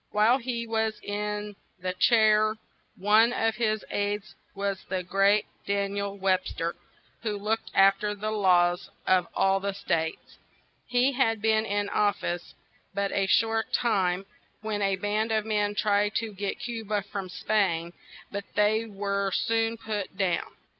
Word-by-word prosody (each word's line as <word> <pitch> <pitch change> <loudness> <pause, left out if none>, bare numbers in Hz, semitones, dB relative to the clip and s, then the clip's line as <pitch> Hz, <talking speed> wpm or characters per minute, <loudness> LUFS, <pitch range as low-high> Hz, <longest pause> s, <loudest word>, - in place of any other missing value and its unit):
While 220 +5 +4
he 235 -2 -3
was 220 -1 -1
in 210 0 -3 0.2
the 185 0 -3
chair 215 +1 +4 0.4
one 215 +4 +5
of 225 -3 0
his 215 -2 0
aids 205 0 -2 0.2
was 200 -1 -2
the 185 0 -1
great 195 +3 +3 0.2
Dan 200 0 0
iel 200 0 -3
Web 190 -1 +1
ster, 170 +1 -3 0.5
who 215 -3 -2
looked 215 +2 -2
af 195 0 +6
ter 210 0 -2
the 215 +1 -3
laws 180 -4 +3 0.2
of 185 -2 +3
all 195 0 +3
the 200 0 -2
states. 160 -4 -3 0.5
He 250 +2 +3
had 225 -4 +1
been 220 +1 +2
in 205 0 0
of 205 -1 +2
fice 175 0 -5 0.4
but 200 0 0
a 195 -1 +1
short 225 +2 +2
time, 190 -5 +1 0.4
when 215 -1 -2
a 195 -1 +2
band 210 +3 -1
of 215 -1 +1
men 210 -1 0
tried 205 0 +1
to 225 -2 -1
get 200 +1 -4
Cu 235 -2 -4
ba 210 -1 -1
from 195 -2 -6
Spain; 175 -5 0 0.4
but 200 0 -4
they 215 +2 +3
were 200 -1 -1
soon 225 +1 0
put 210 -4 -5
down. 190 -3 -1
205 Hz, 160 wpm, -27 LUFS, 195-220 Hz, 0.5 s, af